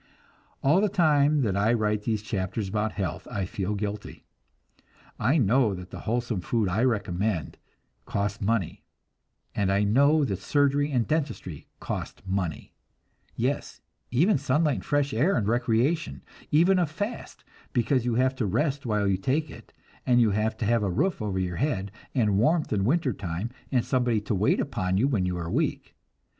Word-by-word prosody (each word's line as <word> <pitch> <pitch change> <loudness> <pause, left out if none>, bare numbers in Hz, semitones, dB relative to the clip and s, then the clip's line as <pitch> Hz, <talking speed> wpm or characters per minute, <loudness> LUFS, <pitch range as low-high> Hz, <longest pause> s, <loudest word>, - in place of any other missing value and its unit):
All 155 +8 +4
the 210 - +2
time 150 -5 +3
that 100 -5 0
I 105 +4 +2
write 105 -2 0
these 110 -3 -1
chapters 100 +1 -3
about 105 +2 -1
health 90 -8 -4
I 100 -2 -2
feel 95 +2 -3
guilty. 105 0 -5 1.0
I 130 +9 +3
know 120 -3 +3
that 90 0 -10
the - - -7
wholesome 120 -4 -1
food 110 +2 0
I 100 +6 0
recommend 100 - -1 0.5
costs 100 0 -2
money, 105 -3 -1 0.7
and 95 -1 0
I 100 +1 +2
know 140 +8 +4
that 100 -7 -2
surgery 145 0 +1
and 125 -4 +1
dentistry 145 - -3
cost - - -5
money 95 -4 -3 0.6
yes, - - -2 0.3
even 155 - +3
sunlight 145 +2 +1
and - - -8
fresh 145 -1 +1
air 150 - +2
and 105 -4 0
recreation; 120 +7 0 0.3
even 175 +5 +4
a 175 - +2
fast, 205 +10 -6 0.3
because 125 +1 +1
you 120 -1 0
have 130 +2 +2
to 115 - 0
rest 135 - -1
while 105 -2 +1
you 95 -1 +2
take 140 +9 -1
it, - - -13 0.3
and 125 -1 +3
you 115 -3 +4
have 110 +2 0
to 115 - -2
have 115 +1 +2
a 100 - 0
roof 180 - 0
over 100 -3 -2
your 90 -2 -2
head, 100 -9 -1 0.2
and 105 -6 +2
warmth 155 +6 +2
in 100 -2 +1
winter 140 0 +1
time, 95 +4 -4 0.2
and 125 -4 +1
somebody 120 -4 +1
to 105 - -2
wait 100 +2 +2
upon 95 -5 -1
you 125 +7 +3
when 105 -10 0
you 90 -1 -2
are 85 -1 -4
weak. - - -2
115 Hz, 175 wpm, -26 LUFS, 100-140 Hz, 1.0 s, All